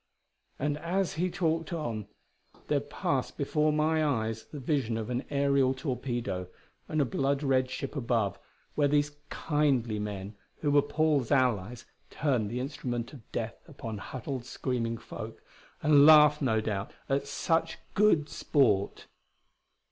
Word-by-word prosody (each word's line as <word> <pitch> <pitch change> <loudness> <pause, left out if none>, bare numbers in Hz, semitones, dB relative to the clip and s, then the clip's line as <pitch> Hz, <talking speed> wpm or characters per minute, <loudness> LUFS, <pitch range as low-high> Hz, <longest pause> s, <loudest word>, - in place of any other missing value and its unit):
And 145 +2 -1
as 185 +3 -1
he 180 +3 0
talked 165 -1 -1
on 120 - -3 0.6
there - - +3
passed - - -2
before 150 0 +1
my 155 +1 +2
eyes 110 -6 -1
the 150 - -9
vision 130 -5 0
of 115 +2 -4
an 125 +2 -1
aerial 140 -2 +2
torpedo 125 - -3 0.4
and 155 - -1
a 145 - +4
blood 135 +3 0
red 130 -2 +2
ship 135 +3 -5
above, 115 -7 0 0.3
where 145 -1 +3
these 145 0 +1
"kindly" 135 -8 +1
men 100 -1 -5 0.3
who 145 - +1
were 145 0 +6
Paul's 145 -3 +1
allies 120 -4 +1 0.2
turned 125 -8 0
the 120 +3 -3
instrument 125 -3 -4
of 130 -7 -14
death 115 -1 -4
upon 115 -9 -6
huddled, 130 +3 -5
screaming 120 -2 -2
folk 115 0 -8 0.4
and 145 -2 +6
laughed, 150 0 +8
no 110 -5 +2
doubt, 105 -2 -2 0.2
at 140 +1 0
such 165 +3 0 0.2
good 195 -8 +4
sport. 105 -13 +1
135 Hz, 140 wpm, -29 LUFS, 115-150 Hz, 0.6 s, laughed